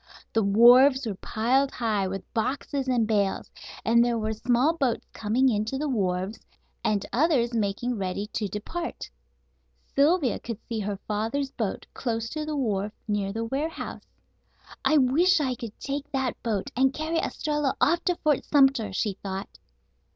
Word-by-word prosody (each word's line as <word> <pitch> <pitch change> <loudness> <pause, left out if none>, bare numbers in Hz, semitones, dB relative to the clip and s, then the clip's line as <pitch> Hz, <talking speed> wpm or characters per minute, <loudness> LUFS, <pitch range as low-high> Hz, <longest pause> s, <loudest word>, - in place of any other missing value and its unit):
The 225 - +3
wharves 245 +6 +6
were 215 - -2
piled 245 +8 +1
high 215 -6 -1
with 195 0 -6
boxes 265 +3 -2
and 245 -3 +2
bales, 200 -3 0 0.3
and 235 +1 +5
there 240 -1 +1
were 220 0 -1
small 245 +7 +2
boats 265 -8 0
coming 230 +5 +1
in 210 -4 +2
to 265 +5 -3
the 300 +2 -2
wharves, 195 -4 -1 0.4
and 210 -2 +1
others 255 -4 +2
making 225 +2 -1
ready 190 +1 -2
to 215 - -1
depart. 230 - -5 0.8
Sylvia 290 -1 +3
could 230 -3 -6
see 230 -2 -3
her 205 -1 -3
father's 225 +7 -1
boat 215 -5 -3
close 230 -2 -2
to 310 -1 -3
the 305 - -2
wharf 210 -5 -1
near 205 -2 -1
the 225 +2 -3
warehouse. 285 +7 -4 0.8
"I 310 - +4
wish 310 +7 +4
I 265 -4 0
could 230 -3 -8
take 280 +1 -4
that 265 -2 -1
boat 215 -5 -2
and 265 +2 +2
carry 320 +2 -1
Estralla 295 -4 -1
off 345 +1 +3
to 360 - +2
Fort 300 -3 +2
Sumter," 270 -7 +3
she 195 0 -2
thought. 195 0 -6
235 Hz, 160 wpm, -26 LUFS, 210-275 Hz, 0.8 s, wharves